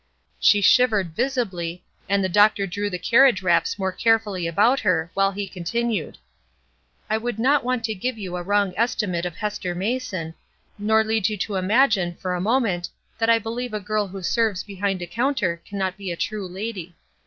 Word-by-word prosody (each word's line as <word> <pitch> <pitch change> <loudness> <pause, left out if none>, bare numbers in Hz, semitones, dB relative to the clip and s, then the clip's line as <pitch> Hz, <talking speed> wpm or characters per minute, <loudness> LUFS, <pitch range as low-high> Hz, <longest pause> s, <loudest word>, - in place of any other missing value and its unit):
She 205 - +5
shivered 205 -6 +3
visibly, 195 -10 -2 0.3
and 200 0 +2
the - - +2
doctor 205 +1 +4
drew 205 +2 -3
the 180 - -3
carriage 235 -1 +4
wraps 175 +1 +2
more 190 -1 -1
carefully 210 -4 +1
about 210 +11 +3
her, 170 -5 0
while 195 0 +2
he 200 0 -4
continued: 210 +2 -3 0.9
"I 220 +1 0
would 240 -1 -3
not 275 +5 +3
want 250 -1 -1
to 220 -1 -1
give 235 +5 -3
you 185 -4 -5
a 180 - -3
wrong 200 +1 +1
estimate 205 -6 0
of 175 - -8
Hester 210 -4 -3
Mason, 195 -5 -3 0.5
nor 220 +2 +3
lead 220 -2 +1
you 215 - -3
to 200 +2 -3
imagine 190 -2 +2
for 185 0 -3
a 180 - -2
moment 205 -5 0 0.3
that 225 0 +2
I 230 - +6
believe 225 +1 -4
a - - -1
girl 210 0 -1
who 190 0 -8
serves 215 -1 0
behind 195 -2 -3
a - - -3
counter 220 -7 -1
cannot 190 -2 -3
be 195 -3 -5
a - - -3
true 205 -1 -3
lady. 185 -2 -6
205 Hz, 185 wpm, -23 LUFS, 185-225 Hz, 0.9 s, I